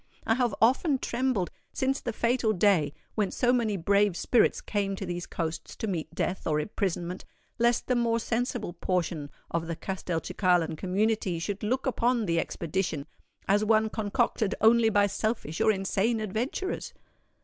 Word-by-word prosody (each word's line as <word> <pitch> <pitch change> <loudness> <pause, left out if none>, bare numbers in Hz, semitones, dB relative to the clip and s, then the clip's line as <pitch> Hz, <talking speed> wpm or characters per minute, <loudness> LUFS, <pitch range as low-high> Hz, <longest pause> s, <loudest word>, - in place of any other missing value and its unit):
"I 225 - +3
have 240 -3 +1
often 265 +5 +3
trembled, 245 -7 -1 0.2
since 270 +1 0
the 240 - -2
fatal 235 -1 +1
day 180 -6 +3 0.2
when 210 -3 0
so 245 -1 +2
many 225 -5 +1
brave 200 +1 +2
spirits 240 - +3
came 200 -2 -2
to 195 - -5
these 175 -1 -4
coasts 160 -1 -4
to - - -4
meet 175 -7 -3
death 185 - -2
or 150 -1 +2
imprisonment, 180 0 -3 0.4
lest 235 0 +2
the 250 - +1
more 235 -1 +2
sensible 235 -5 -2
portion 170 -4 -2 0.2
of 165 -1 -1
the 170 - -3
Castelcicalan 175 -2 0
community 195 +1 0
should 195 +4 -3
look 250 +5 -1
upon 245 -3 +1
the 170 -2 +1
expedition 165 -3 -2 0.4
as 205 +2 +3
one 220 0 +3
concocted 215 -1 0
only 225 0 +5
by 205 -1 +4
selfish 205 -6 -2
or 220 - +5
insane 200 +3 0
adventurers." 230 - -3
205 Hz, 155 wpm, -28 LUFS, 180-230 Hz, 0.4 s, only